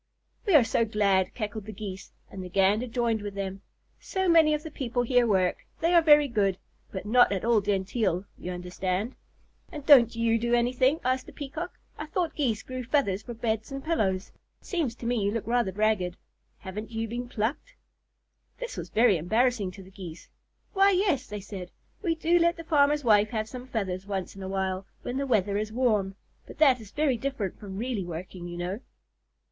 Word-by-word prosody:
"We 385 - +5
are 285 - +8
so 230 - +1
glad," 200 -4 +1
cackled 215 -2 -4
the - - -5
Geese, 195 -2 -7 0.2
and 190 - -7
the 180 - -7
Gander 195 +6 +2
joined 230 -2 0
with 205 -1 -6
them. 195 -1 -4 0.4
"So 380 -1 -2
many 320 -3 +6
of 300 - -5
the 320 - -7
people 245 -3 -1
here 245 0 +3
work. 185 -4 +2 0.2
They 335 +2 +2
are 340 - +7
very 295 -2 +6
good, 200 -6 +1 0.3
but 190 0 -5
not 245 +2 +5
at 195 +1 -1
all 230 -2 +4
genteel, 195 -1 0
you 180 - -6
understand." 180 +5 -3 0.6
"And 295 -2 -8
don't 245 -6 +7
you 230 0 +2
do 240 +1 +2
anything?" 255 +5 +2
asked 255 0 0
the - - -9
Peacock. 305 +5 -6 0.2
"I 305 - -5
thought 335 +1 -1
Geese 235 -8 -1
grew 255 -1 -5
feathers 235 -7 +1
for 240 0 -8
beds 220 +1 -2
and 275 0 -5
pillows. 200 - 0 0.3
It - - -24
seems 315 - -1
to 240 - -9
me 240 -2 +1
you 200 - +2
look 225 +1 -3
rather 235 -4 +1
ragged. 210 -3 0 0.4
Haven't 210 +4 -7
you 225 0 -3
been 240 +2 -5
plucked?" 245 - -3 0.8
This - - -6
was - - -5
very 220 -4 +4
embarrassing 220 +4 +1
to 190 +1 -11
the 190 - -16
Geese. 180 -3 -10 0.4
"Why, 390 0 +5
yes," 365 -8 +1
they 210 0 -6
said, 190 -3 -8 0.3
"we 340 -5 0
do 335 +2 +3
let 340 +1 +3
the 330 - -7
farmer's 295 -2 +3
wife 210 -3 +4
have 220 -2 -2
some 250 +1 -8
feathers 195 -5 -3
once 195 -2 -4
in 195 - -9
a 190 - -5
while, 190 0 -2 0.2
when 245 - -3
the 275 0 -1
weather 205 -4 +2
is 215 0 -3
warm, 215 -5 +1 0.3
but - - -11
that 265 -6 +5
is 215 - -11
very 290 -2 +1
different 235 -7 -3
from 195 -2 -7
really 235 -3 -2
working, 175 +1 -7
you 175 0 -7
know." 180 +4 -3
225 Hz, 200 wpm, -27 LUFS, 195-265 Hz, 0.8 s, are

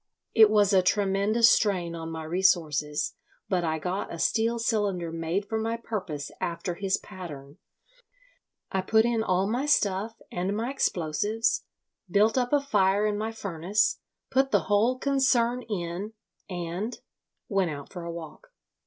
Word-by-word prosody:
It 220 -2 +7
was 205 -1 +4
a 190 - +6
tremendous 200 +4 +3
strain 185 -7 +2
on 165 -1 -6
my 160 -1 -5
resources, 155 -4 +1 0.3
but 180 -2 0
I 160 -1 0
got 180 +5 -3
a 170 - -5
steel 230 +6 +1
cylinder 205 -7 0
made 165 +5 -2
for 220 +1 -1
my 225 +1 -1
purpose 185 -11 -5
after 170 +1 -2
his 195 +2 0
pattern. 150 -7 -10 1.1
I 190 - 0
put 220 +4 +3
in 235 -2 +1
all 185 -3 +1
my 250 +7 -1
stuff 210 -4 +1
and 190 +4 -2
my 235 +4 -2
explosives, 210 - 0 0.4
built 210 +4 +3
up 245 -1 +1
a 290 -1 +4
fire 205 -6 +2
in 210 -1 +1
my 215 +2 -2
furnace, 195 -1 0 0.3
put 270 +1 +3
the 205 -6 +3
whole 205 +9 +2
concern 255 -3 +2
in, 185 +2 -4 0.4
and—went 185 +1 -4
out 145 -2 -7
for 175 -2 -6
a 170 - -5
walk." 170 - -9
195 Hz, 150 wpm, -27 LUFS, 170-225 Hz, 1.1 s, It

